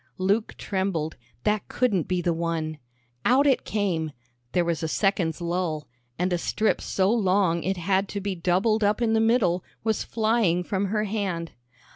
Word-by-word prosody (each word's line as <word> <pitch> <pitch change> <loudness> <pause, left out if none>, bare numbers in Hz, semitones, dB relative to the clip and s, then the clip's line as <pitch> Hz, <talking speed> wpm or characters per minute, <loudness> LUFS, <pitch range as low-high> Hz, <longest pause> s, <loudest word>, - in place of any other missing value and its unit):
Luke 200 +4 0
trembled; 190 -6 -2 0.3
that 210 -1 0
couldn't 210 -10 +1
be 180 -1 0
the 175 - +2
one. 165 -2 -2 0.4
Out 265 +3 +4
it 270 -3 +3
came, 170 -8 -1 0.4
there 175 -1 +2
was 170 -1 -1
a 160 - -1
second's 180 -2 +1
lull, 170 -3 -2 0.3
and 180 +1 0
a 175 - +1
strip 215 +5 0
so 190 +1 +1
long 190 -6 +2
it 190 +2 -1
had 190 +3 +1
to 200 - -3
be 200 0 -2
doubled 185 +5 +1
up 205 +2 +2
in 230 -2 +2
the 220 - +3
middle 225 -6 +2 0.2
was 220 -1 0
flying 215 -6 +1
from 195 +2 -1
her 210 +2 0
hand. 195 -6 -2
190 Hz, 170 wpm, -26 LUFS, 170-215 Hz, 0.4 s, Out